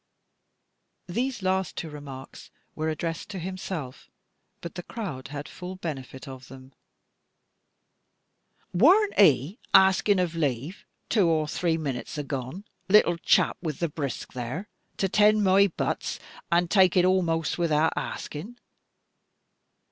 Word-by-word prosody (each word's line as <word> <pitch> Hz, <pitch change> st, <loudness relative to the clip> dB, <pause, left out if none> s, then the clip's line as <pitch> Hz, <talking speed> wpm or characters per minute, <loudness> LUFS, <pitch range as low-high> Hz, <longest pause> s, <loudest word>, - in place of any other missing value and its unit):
These 235 Hz, +3 st, -2 dB
last 190 Hz, -1 st, 0 dB
two 165 Hz, -, -4 dB
remarks 140 Hz, -3 st, -10 dB, 0.2 s
were 155 Hz, 0 st, -2 dB
addressed 165 Hz, +3 st, -4 dB
to 200 Hz, -, -6 dB
himself, 185 Hz, -6 st, -6 dB, 0.5 s
but 170 Hz, -, -7 dB
the 175 Hz, -, -6 dB
crowd 175 Hz, -, -6 dB
had 145 Hz, +1 st, -6 dB
full 180 Hz, +1 st, -8 dB
benefit 140 Hz, -6 st, -7 dB
of 130 Hz, -1 st, -9 dB
them. 130 Hz, 0 st, -13 dB, 2.0 s
"Worn't 370 Hz, -, +5 dB
'e 165 Hz, -, +4 dB, 0.2 s
axing 190 Hz, +1 st, +5 dB
of 175 Hz, -2 st, 0 dB
lave, 145 Hz, -, -3 dB, 0.2 s
two 205 Hz, -6 st, +3 dB
or 155 Hz, -2 st, +2 dB
dree 165 Hz, +2 st, 0 dB
minutes 140 Hz, -3 st, -4 dB
agone, 140 Hz, +4 st, -4 dB, 0.3 s
little 190 Hz, -4 st, +5 dB
chap -, -, +3 dB
with 155 Hz, -5 st, -3 dB
the 170 Hz, -, -1 dB
brisk 145 Hz, -3 st, -5 dB
there, 130 Hz, -, -5 dB, 0.3 s
to 195 Hz, -, +1 dB
tend 210 Hz, +2 st, +4 dB
my 195 Hz, +1 st, +5 dB
butts, 175 Hz, -, -3 dB, 0.3 s
and 170 Hz, 0 st, +2 dB
tuk 190 Hz, -3 st, +5 dB
it 180 Hz, -, +5 dB
amost 170 Hz, -4 st, +1 dB
wiout 160 Hz, -2 st, +2 dB
axing? 200 Hz, +12 st, -5 dB
170 Hz, 125 wpm, -26 LUFS, 145-190 Hz, 2.0 s, Worn't